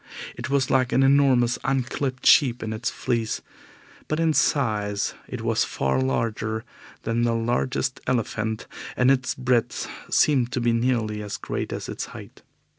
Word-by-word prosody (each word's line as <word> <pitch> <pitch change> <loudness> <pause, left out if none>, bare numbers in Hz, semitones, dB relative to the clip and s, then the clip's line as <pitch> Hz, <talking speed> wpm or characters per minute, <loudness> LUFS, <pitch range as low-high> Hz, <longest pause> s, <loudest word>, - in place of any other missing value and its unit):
It - - -6
was 135 -2 +1
like 130 -2 +2
an 135 - +4
enormous 135 -3 +4
unclipped 130 0 -1
sheep 125 -5 +5
in 110 -1 -3
its 110 - -2
fleece, 115 -3 -2 0.6
but 155 - -1
in 165 -1 +3
size 105 -9 +1
it - - -6
was - - +2
far 65 -1 0
larger 110 - -1 0.4
than 115 +1 0
the 120 -1 +2
largest 125 +3 -1
elephant, 110 -3 -1 0.3
and 125 +2 +5
its 130 -1 +1
breadth 125 -2 0 0.2
seemed 130 -5 +3
to 130 - 0
be 120 -1 +2
nearly 115 -3 0
as 105 -1 -5
great - - -4
as - - -4
its - - -4
height. - - -12
120 Hz, 155 wpm, -24 LUFS, 110-130 Hz, 0.6 s, sheep